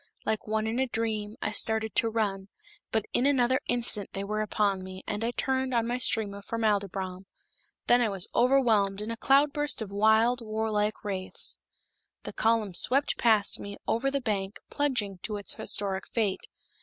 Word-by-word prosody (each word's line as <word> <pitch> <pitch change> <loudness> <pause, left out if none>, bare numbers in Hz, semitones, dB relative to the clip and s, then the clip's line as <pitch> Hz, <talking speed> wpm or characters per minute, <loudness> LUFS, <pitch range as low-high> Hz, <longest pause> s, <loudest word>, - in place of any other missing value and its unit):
Like 220 0 -2
one 215 0 0
in 225 +3 -1
a 265 - +1
dream, 220 -2 -3
I 210 - -1
started 220 0 +3
to 230 - +3
run, 200 -4 -2 0.4
but 220 -2 0
in 255 - +3
another 260 -1 +2
instant 235 -4 +1
they 195 - -3
were 215 +1 -2
upon 205 -2 0
me, 185 0 -9
and 210 +1 -3
I 230 - 0
turned 260 +1 -1
on 230 -1 +2
my 245 +2 -2
stream 220 -4 +2
of 200 0 -9
formaldybrom. 195 -4 -2 0.6
Then 245 0 +4
I 230 - +2
was 195 -3 -1
overwhelmed 230 -6 +3
in 215 +2 -3
a - - -3
cloud 280 +4 +3
burst 295 0 -1
of 215 -3 -5
wild 220 +4 +3
warlike 215 -1 -1
wraiths. 190 -2 -2 0.7
The - - -7
column 220 -3 +1
swept 270 +10 +2
past 220 -3 +3
me, 200 0 -7
over 255 +4 +1
the 280 0 -2
bank, 200 -4 -2
plunging 245 -10 -1
to 210 +3 -4
its 200 - -1
historic 195 -2 -2
fate. 210 -5 -1
220 Hz, 180 wpm, -28 LUFS, 200-240 Hz, 0.7 s, Then